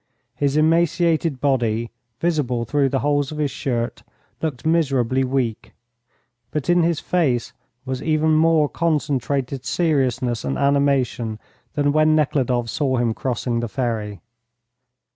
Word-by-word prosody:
His 145 0 0
emaciated 165 -1 +2
body, 120 -5 0 0.3
visible 140 -8 0
through 140 +4 +1
the 135 0 -1
holes 145 -1 +1
of 155 - -6
his 150 -2 0
shirt, 120 -3 -3 0.4
looked 150 -5 -3
miserably 135 -6 +2
weak, 125 -4 -2 0.8
but 150 +3 -1
in 175 0 +4
his 165 -2 +1
face 135 -10 0 0.3
was 130 -1 -3
even 155 0 +1
more 155 -1 +4
concentrated 140 -5 -1
seriousness 130 -8 0
and 70 -1 -2
animation 140 -5 +1 0.4
than 145 -1 +2
when 155 +1 +4
Nekhludoff 130 -5 +1
saw 130 +1 0
him 120 -2 +1
crossing 120 -1 -2
the 120 - -2
ferry. 110 -5 -3
140 Hz, 125 wpm, -21 LUFS, 125-155 Hz, 0.8 s, in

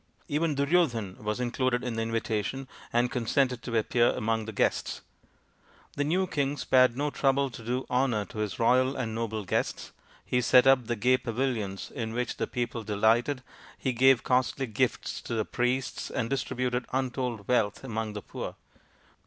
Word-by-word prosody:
Even 155 +1 0
Duryodhan 140 - +1
was 105 +2 -2
included 125 0 0
in 125 -2 -2
the 115 - -1
invitation, 115 +3 -2 0.2
and 120 +1 +2
consented 125 0 +1
to 115 -1 -2
appear 120 +2 +3
among 110 0 -1
the 110 - -5
guests. 100 - 0 0.9
The 145 - 0
new 180 +6 +1
king 145 -5 -1
spared 130 -3 +4
no 145 +1 0
trouble 135 -1 +1
to 115 - -9
do 125 +3 -2
honour 125 -5 +1
to 110 - -9
his 105 -3 -2
royal 130 +3 +3
and 115 -4 -3
noble 110 -2 -3
guests. - - -2 0.3
He 125 - +1
set 125 +2 +6
up 135 -3 +5
the 120 - 0
gay 125 +3 +3
pavilions 115 -6 -2
in 115 -4 -4
which 125 +1 -2
the - - -1
people 120 -2 -3
delighted, 115 +6 +2 0.3
he 130 - -1
gave 130 +1 +5
costly 130 +1 +1
gifts 125 +2 -1
to 115 - -4
the 110 -2 0
priests, 125 +1 -1
and 115 -1 -2
distributed 125 -2 -1
untold 125 -5 -2
wealth 110 -4 +1
among 110 -4 -3
the 105 - -6
poor. - - -6
125 Hz, 170 wpm, -28 LUFS, 115-130 Hz, 0.9 s, set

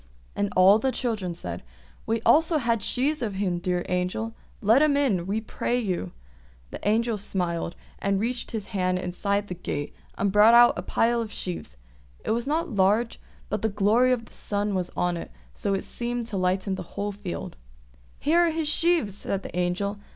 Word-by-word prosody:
And 205 -1 -1
all 190 +3 +7
the 265 +3 +1
children 215 -10 -2
said, 175 - -6 0.5
"We 225 0 0
also 320 +1 +4
had 230 -5 +1
sheaves 290 +8 0
of 210 -5 -2
him, 185 -3 -1
dear 180 0 -1
Angel; 180 +5 -1 0.3
let 225 +6 +4
him 300 -2 +4
in, 200 -12 +1
we 205 +3 0
pray 235 +2 -2
you!" 185 - -2 0.6
The - - -6
Angel 225 +1 +2
smiled, 175 -4 -2 0.2
and 195 0 +1
reached 235 +3 -2
his 220 -3 -2
hand 185 -2 +1
inside 200 +3 -1
the 180 - -4
gate 145 -4 -4 0.2
and 200 0 +1
brought 210 +3 +7
out 240 0 +8
a - - -3
pile 235 +5 +1
of 220 -2 -5
sheaves; 170 - -5 0.5
it - - 0
was 235 +3 -1
not 315 +1 0
large, 210 +3 +2 0.3
but 210 - -2
the 220 - +1
glory 215 +5 +3
of 235 -2 0
the - - -19
sun 205 0 -2
was 180 -2 -1
on 175 -1 +1
it, - - -7 0.2
so 200 - -1
that - - +2
it - - -5
seemed 240 0 -3
to 220 -3 -5
lighten 185 +1 0
the 190 - -4 0.2
whole 205 0 -1
field. 200 -3 -6 0.6
"Here 325 +4 +2
are 345 -1 +4
his 320 -1 -1
sheaves!" 305 - +2
said 195 -1 -3
the - - -8
Angel. 180 +3 -1
205 Hz, 195 wpm, -26 LUFS, 185-235 Hz, 0.6 s, out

